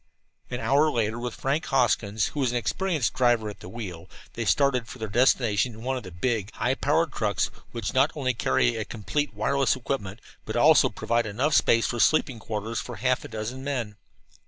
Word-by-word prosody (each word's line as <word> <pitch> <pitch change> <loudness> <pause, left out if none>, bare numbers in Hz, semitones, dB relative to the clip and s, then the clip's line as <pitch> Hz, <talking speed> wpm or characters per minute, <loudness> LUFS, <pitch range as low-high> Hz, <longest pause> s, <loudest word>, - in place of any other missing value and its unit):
An 125 - -4
hour 140 +7 +3
later, 115 -3 -1
with 120 -1 -4
Frank 140 +4 -1
Hoskins, 110 -5 +1
who 150 - -6
was 130 -3 +2
an 120 - 0
experienced 155 - -1
driver, 120 -4 +2
at - - -14
the 90 - -10
wheel, 95 -6 -7 0.2
they 115 - -3
started 125 +5 +2
for - - -9
their 110 -2 -4
destination 115 -1 +2
in 110 +1 -11
one 130 +1 -1
of 130 - -4
the 95 - -9
big, 105 +3 -2
high 125 - 0
powered 145 +3 +1
trucks 105 -6 0 0.2
which 115 -4 -4
not 135 +3 +4
only 130 -4 0
carry 60 - +1
a - - -1
complete 145 +7 -3
wireless 140 -1 +1
equipment 115 -6 -4 0.2
but - - -5
also - - +6
provide 115 -1 -1
enough 130 +9 0
space 115 -4 +4
for 120 - -2
sleeping 130 -1 +3
quarters 110 +1 -4
for - - -7
half 130 0 0
a - - -7
dozen 115 +4 -5
men. 125 -7 -3
120 Hz, 200 wpm, -26 LUFS, 110-130 Hz, 0.2 s, also